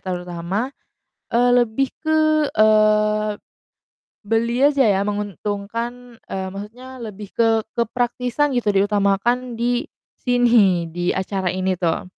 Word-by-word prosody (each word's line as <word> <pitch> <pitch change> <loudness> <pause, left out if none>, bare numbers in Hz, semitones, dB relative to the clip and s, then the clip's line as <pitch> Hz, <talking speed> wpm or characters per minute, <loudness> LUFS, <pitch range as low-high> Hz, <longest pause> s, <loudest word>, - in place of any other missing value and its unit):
terutama, 180 +6 -4 0.6
eee, 245 +1 +3
lebih 245 +3 +1 0.2
ke, 315 0 +2 0.3
eee, 215 -1 +3 0.9
beli 235 +4 +2
aja 285 -2 +3
ya 200 +1 +1
menguntungkan, 210 +4 -4
eee, 190 0 -4
maksudnya 240 +7 -9
lebih 210 -3 -8
ke 225 -1 +2 0.2
kepraktisan 245 +4 0
gitu 210 -4 0
diutamakan 205 +5 +1
di 240 +1 -1 0.3
sini? 225 -9 +3
Di 175 +1 -1
acara 190 0 -3
ini 185 -1 -1
tuh. 165 -3 0
215 Hz, 110 wpm, -21 LUFS, 195-245 Hz, 0.9 s, eee